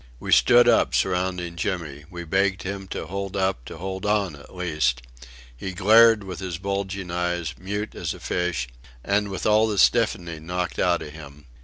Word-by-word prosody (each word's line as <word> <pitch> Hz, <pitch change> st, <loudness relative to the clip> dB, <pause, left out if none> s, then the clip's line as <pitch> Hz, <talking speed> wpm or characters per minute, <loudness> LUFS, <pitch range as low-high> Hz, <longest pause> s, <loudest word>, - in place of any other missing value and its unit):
We -, -, -5 dB
stood 120 Hz, 0 st, +6 dB
up 120 Hz, -, +4 dB
surrounding 90 Hz, -2 st, -1 dB
Jimmy. 80 Hz, -5 st, -3 dB
We 85 Hz, -2 st, -7 dB
begged 95 Hz, +2 st, +1 dB
him 95 Hz, 0 st, -5 dB
to -, -, -5 dB
hold 100 Hz, +1 st, -4 dB
up, 95 Hz, -8 st, 0 dB
to -, -, -9 dB
hold 95 Hz, +2 st, -5 dB
on, 105 Hz, -5 st, +1 dB
at 70 Hz, +5 st, -15 dB
least. 75 Hz, -8 st, 0 dB, 0.5 s
He 95 Hz, +10 st, -6 dB
glared 110 Hz, +3 st, +6 dB
with 95 Hz, -3 st, -7 dB
his 90 Hz, -3 st, -4 dB
bulging 100 Hz, -1 st, -3 dB
eyes, 90 Hz, -2 st, -2 dB
mute 105 Hz, +3 st, -4 dB
as -, -, -4 dB
a -, -, -12 dB
fish, 85 Hz, -7 st, -2 dB, 0.4 s
and 100 Hz, +1 st, +1 dB
with 95 Hz, -2 st, -5 dB
all 110 Hz, +1 st, +4 dB
the 105 Hz, -2 st, -2 dB
stiffening 90 Hz, -8 st, +2 dB
knocked 90 Hz, -6 st, -3 dB
out -, -, +2 dB
of 75 Hz, -, -9 dB
him. 75 Hz, -2 st, -12 dB
95 Hz, 180 wpm, -24 LUFS, 85-100 Hz, 0.5 s, stood